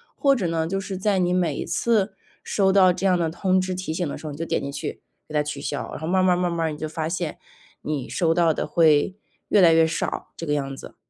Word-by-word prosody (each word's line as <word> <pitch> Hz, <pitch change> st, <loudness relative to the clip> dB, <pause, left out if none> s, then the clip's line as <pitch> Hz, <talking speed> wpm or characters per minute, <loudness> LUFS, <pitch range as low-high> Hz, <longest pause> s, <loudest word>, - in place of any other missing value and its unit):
或 275 Hz, -1 st, +3 dB
者 200 Hz, -7 st, -2 dB
呢， 165 Hz, -1 st, -1 dB
就 195 Hz, +2 st, -1 dB
是 195 Hz, 0 st, -5 dB
在 195 Hz, +1 st, +1 dB
你 180 Hz, -1 st, +1 dB
每 175 Hz, -5 st, +1 dB
一 -, -, -4 dB
次 220 Hz, -3 st, +1 dB, 0.3 s
收 195 Hz, -2 st, +2 dB
到 185 Hz, -2 st, +5 dB
这 195 Hz, +2 st, -1 dB
样 180 Hz, -1 st, +3 dB
的 165 Hz, -2 st, 0 dB
通 185 Hz, +2 st, +1 dB
知 185 Hz, 0 st, -2 dB
提 180 Hz, -3 st, -4 dB
醒 175 Hz, -3 st, -1 dB
的 -, -, -4 dB
时 155 Hz, -, -8 dB
候， -, -, -4 dB
你 145 Hz, -, -8 dB
就 165 Hz, -, -3 dB
点 -, -, -1 dB
进 140 Hz, -, -4 dB
去， 145 Hz, +1 st, -5 dB, 0.3 s
给 155 Hz, -, -11 dB
它 150 Hz, -, +3 dB
取 150 Hz, -1 st, -4 dB
消， 145 Hz, 0 st, -4 dB
然 -, -, -6 dB
后 160 Hz, -, -5 dB
慢 185 Hz, +1 st, +2 dB
儿 -, -, +2 dB
慢 180 Hz, -1 st, +4 dB
儿 -, -, +1 dB
慢 170 Hz, -, -3 dB
儿 -, -, -2 dB
你 150 Hz, -, -6 dB
就 155 Hz, -, -4 dB
发 160 Hz, 0 st, -3 dB
现， 175 Hz, -3 st, -3 dB, 0.4 s
你 145 Hz, -4 st, -3 dB
收 165 Hz, -2 st, +1 dB
到 165 Hz, -2 st, +3 dB
的 -, -, -3 dB
会 160 Hz, +2 st, +3 dB, 0.3 s
越 205 Hz, -, +4 dB
来 170 Hz, -3 st, +7 dB
越 160 Hz, 0 st, +5 dB
少， -, -, -3 dB
这 165 Hz, -, -5 dB
个 145 Hz, -, 0 dB
样 135 Hz, -2 st, -2 dB
子。 -, -, -11 dB
170 Hz, 305 characters per minute, -24 LUFS, 155-185 Hz, 0.4 s, 来